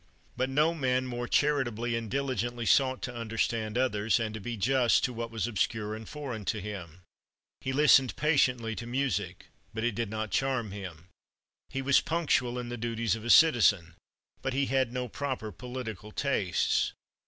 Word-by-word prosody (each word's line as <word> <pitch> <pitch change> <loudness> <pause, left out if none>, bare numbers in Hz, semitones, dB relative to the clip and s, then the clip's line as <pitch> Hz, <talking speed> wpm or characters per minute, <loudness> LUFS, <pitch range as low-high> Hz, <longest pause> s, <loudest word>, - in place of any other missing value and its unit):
But 130 +2 -1
no 150 +5 +3
man 130 -5 0
more 120 -1 -4
charitably 120 -6 +1
and 115 -1 -4
diligently 120 -3 -2
sought 130 +2 +3
to 125 - -4
understand 115 -1 -2
others, 115 -3 +1
and 110 -2 -2
to 110 - -5
be 115 +2 -5
just 125 +3 +3
to 125 - 0
what 115 0 -4
was 115 -2 -2
obscure 110 -1 -1
and 110 0 -8
foreign 135 -8 -5
to 105 - -1
him. 90 -4 -7 0.6
He 130 - -3
listened 135 -2 +5
patiently 125 -7 +2
to 115 - -6
music. 120 -8 -2 0.3
But 110 - -2
it 120 -1 +1
did 115 0 -2
not 110 0 -4
charm 130 -6 0
him. 95 -3 -8 0.6
He 135 - -3
was 140 0 +4
punctual 140 -7 0
in 120 -1 -4
the 120 - -4
duties 115 -1 -1
of 110 - -8
a 120 - -4
citizen. 105 - +5 0.5
But 135 - -2
he 140 +1 +1
had 130 -2 +1
no 125 0 -3
proper 130 -3 -4
political 110 -1 -7
tastes. 105 -9 0
120 Hz, 175 wpm, -29 LUFS, 110-130 Hz, 0.6 s, listened